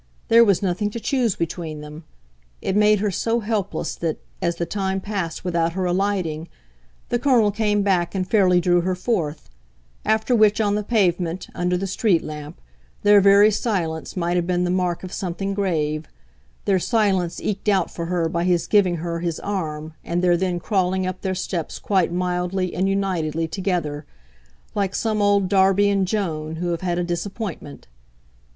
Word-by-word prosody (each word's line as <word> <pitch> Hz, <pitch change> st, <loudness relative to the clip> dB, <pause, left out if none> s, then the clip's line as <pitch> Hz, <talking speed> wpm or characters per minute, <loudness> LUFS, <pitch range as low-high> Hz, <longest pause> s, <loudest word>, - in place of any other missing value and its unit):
There 230 Hz, +1 st, +7 dB
was 200 Hz, -3 st, +2 dB
nothing 195 Hz, +3 st, 0 dB
to 235 Hz, -, -6 dB
choose 240 Hz, -4 st, 0 dB
between 160 Hz, -2 st, -4 dB
them. 150 Hz, +2 st, -10 dB, 0.5 s
It 190 Hz, -, -2 dB
made 210 Hz, -1 st, +4 dB
her 210 Hz, -1 st, +1 dB
so 230 Hz, +5 st, 0 dB
helpless 210 Hz, -2 st, -2 dB
that, 165 Hz, -2 st, -2 dB, 0.2 s
as 170 Hz, -2 st, 0 dB
the 170 Hz, -, -2 dB
time 190 Hz, +1 st, -2 dB
passed 190 Hz, -4 st, -4 dB
without 170 Hz, -2 st, 0 dB
her 185 Hz, 0 st, -1 dB
alighting, 180 Hz, -4 st, -1 dB, 0.6 s
the 240 Hz, -, +1 dB
Colonel 240 Hz, -6 st, +3 dB
came 210 Hz, -1 st, +1 dB
back 185 Hz, -2 st, +1 dB
and 185 Hz, -1 st, -1 dB
fairly 185 Hz, -4 st, +4 dB
drew 175 Hz, 0 st, +3 dB
her 185 Hz, +1 st, -1 dB
forth; 170 Hz, -7 st, -2 dB, 0.6 s
after 220 Hz, +3 st, +2 dB
which, 215 Hz, -1 st, +4 dB
on 205 Hz, -2 st, +2 dB
the 210 Hz, -, 0 dB
pavement, 185 Hz, -5 st, 0 dB
under 180 Hz, 0 st, 0 dB
the 195 Hz, -, -2 dB
street 190 Hz, -2 st, +1 dB
lamp, 150 Hz, -1 st, -8 dB, 0.4 s
their 205 Hz, 0 st, +7 dB
very 200 Hz, +2 st, +6 dB
silence 185 Hz, -6 st, -2 dB
might 175 Hz, 0 st, 0 dB
have 175 Hz, -1 st, 0 dB
been 180 Hz, -1 st, +1 dB
the 175 Hz, -, 0 dB
mark 180 Hz, -1 st, -1 dB
of 185 Hz, -, -7 dB
something 195 Hz, +2 st, -3 dB
grave 155 Hz, -6 st, -1 dB, 0.6 s
their 195 Hz, -2 st, +3 dB
silence 190 Hz, -5 st, +1 dB
eked 210 Hz, 0 st, -2 dB
out 190 Hz, -4 st, +2 dB
for 170 Hz, -1 st, -5 dB
her 175 Hz, -2 st, 0 dB
by 170 Hz, +1 st, -1 dB
his 175 Hz, -2 st, +2 dB
giving 195 Hz, -4 st, +3 dB
her 170 Hz, 0 st, -3 dB
his 170 Hz, -1 st, -2 dB
arm 160 Hz, -6 st, -4 dB
and 175 Hz, +1 st, -2 dB
their 175 Hz, -1 st, +4 dB
then 180 Hz, 0 st, -1 dB
crawling 185 Hz, -1 st, 0 dB
up 185 Hz, 0 st, -4 dB
their 190 Hz, -1 st, -2 dB
steps 180 Hz, -2 st, -3 dB
quite 190 Hz, -4 st, +1 dB
mildly 180 Hz, +1 st, -1 dB
and 190 Hz, +2 st, 0 dB
unitedly 165 Hz, -5 st, -1 dB
together, 160 Hz, -5 st, -2 dB, 0.7 s
like 200 Hz, -1 st, -1 dB
some 215 Hz, -2 st, 0 dB
old 200 Hz, -1 st, +3 dB
Darby 195 Hz, +1 st, +4 dB
and 195 Hz, -2 st, +1 dB
Joan 160 Hz, -6 st, -2 dB
who 175 Hz, +2 st, -3 dB
have 170 Hz, -1 st, -2 dB
had 175 Hz, -2 st, -1 dB
a 175 Hz, -, 0 dB
disappointment. 175 Hz, -2 st, -5 dB
185 Hz, 175 wpm, -22 LUFS, 170-205 Hz, 0.7 s, There